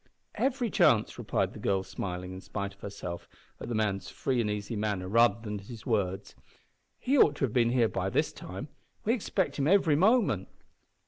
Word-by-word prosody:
"Every 260 -4 0
chance," - - +3
replied - - -1
the - - -9
girl, 95 -1 0
smiling, 90 -1 -5
in 95 - -8
spite 100 0 -4
of - - -24
herself, 100 -4 -7 0.3
at - - -7
the 120 - -2
man's 105 -3 -1
free 130 -3 -1
and 105 - -1
easy 105 +2 -3
manner 105 -3 -2
rather 115 +1 +4
than 105 -2 -5
his 110 +3 -11
words. 100 -4 -1 0.6
"He 275 +2 +1
ought 145 - +6
to 140 - +1
have 115 - -5
been 120 -2 +3
here 120 -2 +3
by - - -2
this - - 0
time. 95 - -8 0.4
We 225 - +3
expect 195 - -1
him 140 - +2
every 170 -4 +4
moment." 170 - +3
110 Hz, 190 wpm, -29 LUFS, 100-145 Hz, 0.6 s, ought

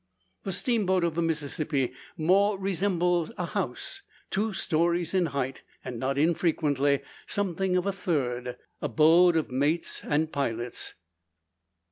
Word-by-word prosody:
The 195 - -1
steamboat 190 -4 +1
of 170 -2 +1
the 170 - -1
Mississippi 150 -4 -1 0.2
more 195 +5 +3
resembles 180 -2 0
a - - -1
house, 395 - -4 0.3
two 215 +3 0
stories 170 -1 +1
in 185 -3 +3
height, 135 -3 -3 0.2
and, 120 -2 -5
not 135 +3 -1
unfrequently, 145 -3 +2 0.3
something 190 -2 0
of 180 - 0
a 200 - +1
third 125 -9 -2 0.2
abode 160 +6 +5
of 160 -5 0
mates 145 +6 0
and 155 +2 0
pilots. 120 -4 -3
165 Hz, 125 wpm, -28 LUFS, 140-185 Hz, 0.3 s, abode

